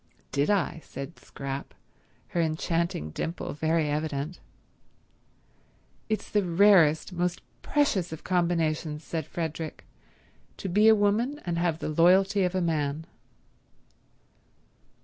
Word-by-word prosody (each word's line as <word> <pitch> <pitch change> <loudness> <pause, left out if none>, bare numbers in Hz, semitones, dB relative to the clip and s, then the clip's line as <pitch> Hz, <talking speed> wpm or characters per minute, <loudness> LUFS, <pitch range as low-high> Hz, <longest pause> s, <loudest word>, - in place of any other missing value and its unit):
"Did 140 +1 +1
I?" 190 -5 +1
said 140 +5 -8
Scrap, 135 0 -6 0.5
her 170 - 0
enchanting 165 - -1
dimple 165 - -4
very 160 +1 +1
evident. 150 +2 -2 1.7
"It's 215 - -1
the 210 - +1
rarest, 175 -2 +4
most 175 0 -1 0.2
precious 205 - +1
of 160 - -7
combinations," 165 -4 0
said 160 -3 -4
Frederick, 160 -1 -5 0.7
"to - - -5
be 205 +4 +4
a 220 - +8
woman 220 +8 +1
and 170 -1 -1
have 170 -2 +1
the 160 - -4
loyalty 190 +5 +4
of 180 0 0
a 185 - +1
man." 155 -2 -1
170 Hz, 115 wpm, -27 LUFS, 155-185 Hz, 1.7 s, a